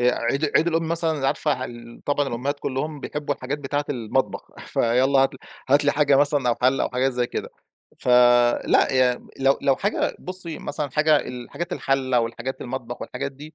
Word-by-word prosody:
آآ 125 0 +3
عيد 140 +6 0
عيد 165 - +3
الأم 165 -1 0
مثلًا 160 -4 0
عارفة 150 +2 +1
ه 130 -1 -3
ال 120 -1 -10
طبعًا 145 -1 +1
الأمهات 140 +5 -3
كلّهم 145 +3 -3
بيحبّوا 145 0 -3
الحاجات 135 +3 -4
بتاعة 145 +1 -2
المطبخ 125 0 -2 0.2
فيالّا 130 +4 +2
هات 135 0 +3
ل - - -12 0.3
هات 145 +2 +4
لي 145 - +3
حاجة 145 -2 +3
مثلًا 145 -2 +2
أو 120 - +3
حَلّة 130 +2 +3
أو - - -1
حاجات 130 +1 0
زي 125 0 0
كده. - - -5 0.5
فلأ 120 0 +4
يعني 125 -1 +2
لو 135 +1 +3
لو 135 -1 +3
حاجة 205 +2 -1
بُصّي 180 -4 -5
مثلًا 145 -1 -4
حاجة 155 +1 +4
الحاجات 145 +8 -5
الحَلّة 130 -3 +1
والحاجات 115 +3 -4
المطبخ 120 -1 -6
والحاجات 140 +2 -5
دي 150 +3 -12
135 Hz, 185 wpm, -23 LUFS, 125-145 Hz, 0.5 s, هات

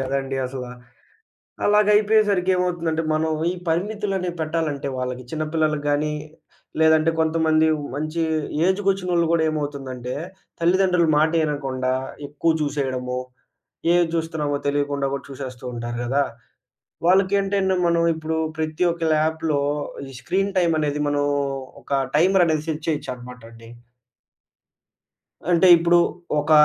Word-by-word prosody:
గదండీ 135 0 -2
అసల. 130 -1 -6 1.0
అలాగయిపోయేసరికి 210 -2 +4
ఏమవుతుందంటే, 170 -3 -1
మనం 160 +1 0 0.2
ఈ - - -3
పరిమితులనేవి 190 0 -1
పెట్టాలంటే, 155 -3 -2
వాళ్ళకి 125 0 -4
చిన్నపిల్లలకు 155 -1 -1
గాని, 150 +1 +1 0.7
లేదంటే 160 0 +4
కొంతమంది 160 0 +3 0.3
మంచి 155 +3 -2 0.5
ఏజ్‌కోచ్చినోళ్ళు 190 -3 +1
గూడా 165 -1 +3
ఏమవుతుందంటే, 135 -5 -4 0.5
తల్లిదండ్రులు 180 -1 +3
మాట 155 +2 +3
ఇనకుండా, 130 -3 -2 0.3
ఎక్కువ 145 +3 0
చూసేయడము, 130 -3 -2 0.8
ఏది 175 -1 +4
జుస్తున్నామో 160 -3 -1
తెలియకుండా 145 -1 0
కూడా 140 - -5
చూసేస్తూంటారు 125 -3 -6
గదా! 135 +4 +1 0.9
వాళ్ళకేంటంటే, 195 +1 +2
మనం 170 0 +2
ఇప్పుడు 160 0 -3 0.2
ప్రతి 155 +2 -1
ఒక్క 170 0 -5
ల్యాప్‌లో 155 -1 0 0.5
ఈ - - -13
స్క్రీన్ 195 +1 -1
టైమ్ 170 -2 +2
అనేది 150 -1 -1
మనం 145 0 +1 0.6
ఒక 135 -1 0
టైమరనేది 170 -3 +3
సెట్ 155 -1 -4
చేయొచ్చన్నమాట 125 -5 -5
అండి. 115 0 -14 1.8
అంటే 175 +1 +5
ఇప్పుడు. 170 +1 +4 0.4
ఒక 150 - -5
155 Hz, 105 wpm, -22 LUFS, 140-175 Hz, 1.8 s, అంటే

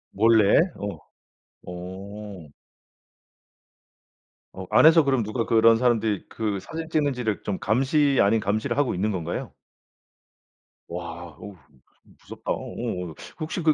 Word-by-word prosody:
원래? 110 -1 +5 0.2
어. 100 0 -5 0.7
오. 95 0 -8 2.0
어 95 - -7
안에서 160 +1 +6
그럼 135 -4 +1
누가 115 +2 -2
그런 115 0 +5
사람들이 115 -4 +1
그 105 -3 -2
사진 160 - -7
찍는지를 130 -9 -1
좀 100 -2 -3
감시 135 +5 +2
아닌 105 +3 +3
감시를 110 +4 -1
하고 145 -7 +1
있는 105 +4 0
건가요? 85 -3 -4 1.4
와. 85 -2 -7
오우 100 -2 -10 0.7
무섭다. - - -6
오오. 90 -3 -4 0.2
혹시 160 +3 -3
그 155 -1 +4
110 Hz, 225 characters per minute, -25 LUFS, 95-130 Hz, 2.0 s, 안에서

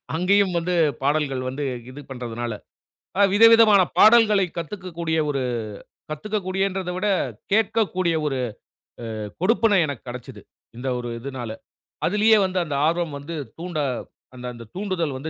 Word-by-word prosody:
அங்கேயும் 190 +2 +3
வந்து 175 +2 -1 0.3
பாடல்கள் 140 -2 +1
வந்து 135 +3 -4 0.3
இது 140 +3 -9
பண்றதுனால. 120 -2 -4 0.7
அ - - +3
விதவிதமான 225 -1 +7 0.2
பாடல்களை 215 -3 +6
கத்துக்க 185 +3 -6
கூடிய 160 -1 0
ஒரு 135 -2 -1 0.7
கத்துக்க 210 +8 -3
கூடியன்றத 190 -1 -1
விட 185 +3 -1 0.5
கேட்கக்கூடிய 200 -5 +1
ஒரு 135 -3 -1 0.8
அ - - -5 0.3
கொடுப்பினை 220 -1 +3
எனக்கு 140 -5 -6
கெடச்சது. 125 0 -8 0.4
இந்த 125 +3 -4
ஒரு 120 - -5
இதுனால 130 -3 -6 0.6
அதுலையே 215 +3 +4
வந்து 185 0 -3
அந்த 150 -3 -3
ஆர்வம் 165 -2 -1
வந்து 150 +4 -7 0.2
தூண்ட 170 -1 -4 0.6
அந்த 125 0 -9
அந்த 120 -1 -10
தூண்டல் 180 -7 -2
வந்து 155 +4 -5
170 Hz, 135 wpm, -23 LUFS, 140-200 Hz, 0.8 s, விதவிதமான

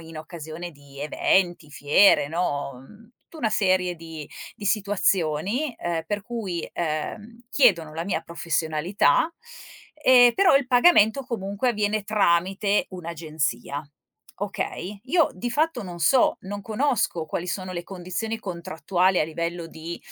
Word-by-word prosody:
in 160 -1 -10
occasione 160 +1 -8
di 140 -1 -16
eventi, 175 +1 +1
fiere, 145 +3 +4
no, 145 -4 -2 0.2
mhmm, 220 +2 -17 0.2
tu 325 - -13
una 230 -6 +1
serie 185 -4 +2
di 160 -3 -9 0.3
di 205 - -9
situazioni, 200 - 0
ehm, 170 -2 -2
per 205 +2 -2
cui, 200 -7 -4
ehm, 190 +9 -4
chiedono 170 - +3
la 165 +1 -3
mia 185 -4 -1
professionalità 170 - +1 0.6
e 255 -5 +6
però 380 -8 +5
il 275 - 0
pagamento 250 -2 +5
comunque 215 +1 -1
avviene 210 -1 0
tramite 200 0 +2
un'agenzia, 155 -6 -3 0.5
okay. 200 -1 -4
Io 325 +4 +3
di 215 +7 -4
fatto 295 -1 0
non 175 -3 -8
so 240 - +4
non 205 +1 -6
conosco 220 - 0
quali 170 +3 -4
sono 185 +1 -4
le 175 -1 -5
condizioni 195 +4 -4
contrattuali 180 0 0
a - - +3
livello 170 +1 -4
di, 165 +1 -7
185 Hz, 135 wpm, -25 LUFS, 165-215 Hz, 0.6 s, e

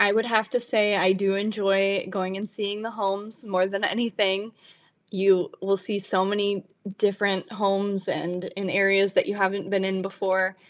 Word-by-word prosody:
I 200 - +6
would 225 +2 +2
have 220 -2 +2
to 245 - 0
say 210 -4 +2
I 185 -1 +4
do 195 0 +1
enjoy 195 -2 +1
going 190 0 -3
and 205 +1 -6
seeing 205 0 -4
the 225 - -5
homes 210 +1 -4
more 185 -3 +1
than 195 +1 -3
anything. 215 -3 0 0.6
You 190 -2 +3
will 195 +1 +1
see 200 +2 -4
so 190 -1 0
many 200 -1 -1 0.3
different 200 -1 0
homes 200 -2 -1
and 180 +1 -3
in 195 -1 -3
areas 195 0 +4
that - - +3
you 200 - -2
haven't 195 -1 -1
been 195 -1 +1
in 190 -1 -1
before, 190 0 0
195 Hz, 180 wpm, -25 LUFS, 190-205 Hz, 0.6 s, I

